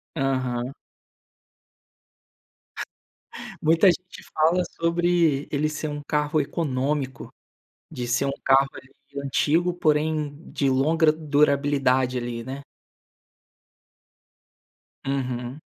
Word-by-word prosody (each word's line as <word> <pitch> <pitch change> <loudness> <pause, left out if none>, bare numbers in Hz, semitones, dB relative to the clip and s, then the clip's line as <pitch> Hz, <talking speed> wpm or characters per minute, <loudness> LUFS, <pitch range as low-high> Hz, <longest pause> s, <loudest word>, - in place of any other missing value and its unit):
Aham. 130 -3 -1 2.9
Muita 165 +5 +4
gente 180 +1 -1
fala 165 +4 +3 0.2
sobre 170 -3 +2
ele 150 +1 0
ser 155 0 -4
um 145 0 -5
carro 150 +1 +1
econômico, 140 -3 -2 0.6
de 125 -6 -4
ser 125 +3 +1
um 140 - 0
carro 135 +1 +5
ali 130 - -12 0.3
antigo, 165 +6 +2
porém 155 -2 0 0.2
de 140 - +1
longa 155 +4 +3
durabilidade 140 -4 +2
ali, 120 -1 -4
né. 135 +3 -7 2.4
Uhum. 130 -1 -3
145 Hz, 90 wpm, -24 LUFS, 130-155 Hz, 2.9 s, carro